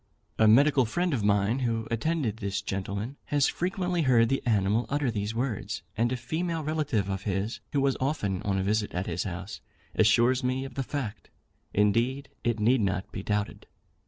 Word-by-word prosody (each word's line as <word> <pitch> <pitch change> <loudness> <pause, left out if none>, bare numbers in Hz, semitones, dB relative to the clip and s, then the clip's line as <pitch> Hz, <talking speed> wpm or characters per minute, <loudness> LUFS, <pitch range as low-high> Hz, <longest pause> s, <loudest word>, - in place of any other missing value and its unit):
A 110 - +6
medical 135 +3 +5
friend 175 +8 0
of 115 -6 0
mine, 100 +4 +2
who 115 -3 -1
attended 125 -2 0
this 100 -2 -3
gentleman, 100 +7 -4
has 145 -2 +2
frequently 180 -1 -1
heard 120 -5 +4
the 135 - +1
animal 105 +1 +2
utter 145 -3 0
these 105 0 -3
words; 110 -4 -2
and 120 +2 +1
a 130 - 0
female 160 +6 -2
relative 145 -10 0
of 95 -1 -2
his, 100 +3 -2
who 140 - +1
was 135 -1 +2
often 130 - -1
on 100 -1 0
a 95 - 0
visit 105 0 0
at 90 +2 -1
his 85 +1 -2
house, 95 +2 -6 0.3
assures 120 +4 +4
me 130 +1 0
of 135 - -8
the 135 - -2
fact. 120 -7 -5 0.4
Indeed 115 +7 +1
it 120 -1 0
need 120 +3 +3
not 95 -1 -1
be - - -5
doubted. 105 +1 -2
115 Hz, 185 wpm, -28 LUFS, 100-135 Hz, 0.4 s, A